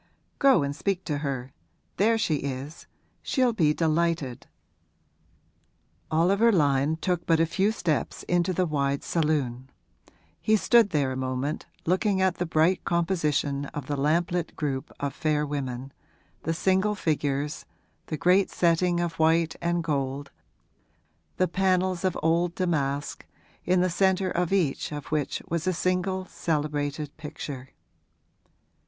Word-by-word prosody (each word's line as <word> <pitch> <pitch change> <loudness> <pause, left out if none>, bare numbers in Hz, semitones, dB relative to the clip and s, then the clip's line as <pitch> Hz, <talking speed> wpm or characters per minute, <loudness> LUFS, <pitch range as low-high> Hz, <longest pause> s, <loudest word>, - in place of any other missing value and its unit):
'Go 270 - +5
and 140 0 -2
speak 190 +2 -1
to 145 -3 -2
her; 135 -3 -4 0.4
there 225 +3 +3
she 175 -9 +1
is 140 +3 -6 0.3
she'll 255 -3 +1
be 160 -8 +3
delighted.' 160 -4 0 1.6
Oliver 195 +8 +4
Lyon 145 -4 +2
took 175 0 -2
but 165 -1 +4
a 165 - +4
few 195 +5 +1
steps 155 - -2
into 175 +1 +1
the 185 0 +1
wide 140 -3 -1
saloon; 140 -6 -1 0.7
he 220 - +3
stood 230 0 +4
there 145 -6 +1
a - - -3
moment 130 +3 -3 0.2
looking 190 +3 +1
at 190 -1 +2
the 175 - -1
bright 165 +3 +2
composition 150 -5 0
of 145 -4 -4
the 145 - -2
lamplit 165 +4 0
group 135 -3 -3
of 140 -1 -2
fair 150 -1 0
women, 135 -2 -4 0.5
the 165 - -1
single 190 +4 +2
figures, 145 -4 -1 0.4
the 155 - -3
great 185 +4 +3
setting 175 +1 +2
of 170 -1 -3
white 160 0 +3
and 170 0 0
gold, 140 -2 -2 1.1
the 185 - +3
panels 185 0 +1
of 185 -2 0
old 170 +2 +2
damask, 145 -6 -1 0.4
in 180 0 +3
the 185 - +2
centre 190 +1 +2
of 175 0 0
each 175 -9 0
of 145 -1 -7
which 150 -2 -1
was 170 +1 -2
a 185 - +2
single 185 +1 -1
celebrated 150 -3 -2
picture. 145 -3 -7
165 Hz, 135 wpm, -26 LUFS, 145-180 Hz, 1.6 s, Go